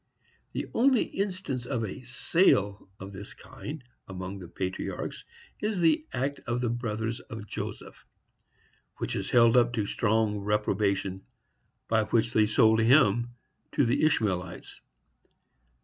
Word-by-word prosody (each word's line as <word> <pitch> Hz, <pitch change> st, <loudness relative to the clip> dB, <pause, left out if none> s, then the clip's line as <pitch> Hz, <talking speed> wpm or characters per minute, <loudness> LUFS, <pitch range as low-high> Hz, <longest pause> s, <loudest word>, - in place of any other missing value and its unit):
The -, -, -2 dB
only 255 Hz, 0 st, +4 dB
instance 185 Hz, -11 st, -3 dB
of 115 Hz, -, -1 dB
a 100 Hz, -, -7 dB
sale 120 Hz, -, +2 dB
of 100 Hz, +1 st, -8 dB
this 100 Hz, +1 st, -9 dB
kind 145 Hz, -2 st, -9 dB, 0.2 s
among 95 Hz, +1 st, -6 dB
the 90 Hz, -, -9 dB
patriarchs 95 Hz, +2 st, -4 dB, 0.3 s
is 210 Hz, -2 st, -1 dB
that 170 Hz, -, +4 dB
act 140 Hz, +3 st, -2 dB
of 120 Hz, 0 st, 0 dB
the 120 Hz, -1 st, 0 dB
brothers 115 Hz, -1 st, -3 dB
of 110 Hz, -5 st, -9 dB
Joseph, -, -, -7 dB, 0.9 s
which -, -, -3 dB
is -, -, -3 dB
held 115 Hz, -1 st, +5 dB
up 120 Hz, -1 st, +4 dB
to 110 Hz, -4 st, 0 dB
so -, -, -5 dB
strong 110 Hz, -1 st, +1 dB
reprobation, 100 Hz, -2 st, -1 dB, 0.6 s
by 110 Hz, -1 st, +2 dB
which 115 Hz, +2 st, +1 dB
they 110 Hz, -1 st, +4 dB
sold 110 Hz, +1 st, +4 dB
him 120 Hz, -1 st, +4 dB, 0.4 s
to 140 Hz, -, +3 dB
the 120 Hz, +5 st, +1 dB
Ishmaelites. 95 Hz, -, -1 dB
115 Hz, 135 wpm, -28 LUFS, 100-130 Hz, 0.9 s, held